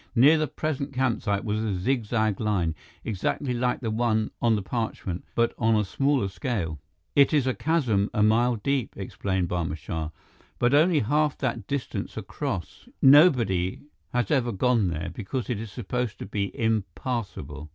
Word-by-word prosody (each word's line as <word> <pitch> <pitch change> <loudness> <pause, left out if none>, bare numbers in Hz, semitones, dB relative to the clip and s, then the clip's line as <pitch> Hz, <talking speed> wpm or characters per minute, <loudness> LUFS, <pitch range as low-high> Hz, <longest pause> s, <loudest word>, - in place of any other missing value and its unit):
Near 145 +7 +6
the 155 - +1
present 140 -3 -3
campsite 115 -6 0
was 105 0 0
a 105 -3 -1
zig 115 +6 0
zag 110 -2 0
line, 95 -7 0 0.3
exactly 115 +6 -1
like 125 +1 0
the 115 -3 -2
one 110 -1 +1
on 115 -2 +4
the 105 - -2
parchment, 95 -4 -3
but 115 0 +2
on 115 -1 +3
a 105 - +3
smaller 135 +1 +1
scale. 95 - -3 0.4
"It 140 +2 +5
is 140 -4 +3
a 130 - +1
chasm 125 -13 +1
a 105 - +2
mile 120 +3 +3
deep," 130 +3 -1
explained 95 -2 -2
Barma 85 -3 -2
Shah, 80 +1 -4 0.5
"but 120 +7 +2
only 155 +1 +5
half 150 +5 +1
that 130 -4 -2
distance 140 -2 -4
across. 95 +2 -5
Nobody 125 - +5 0.3
has 120 -4 0
ever 125 -4 +2
gone 115 0 +2
there, 85 0 -3
because 115 +5 -4
it 110 - -2
is 110 -2 -6
supposed 125 0 -3
to - - -6
be 100 0 -2
impassable." 100 - -2
115 Hz, 165 wpm, -26 LUFS, 95-130 Hz, 0.5 s, Near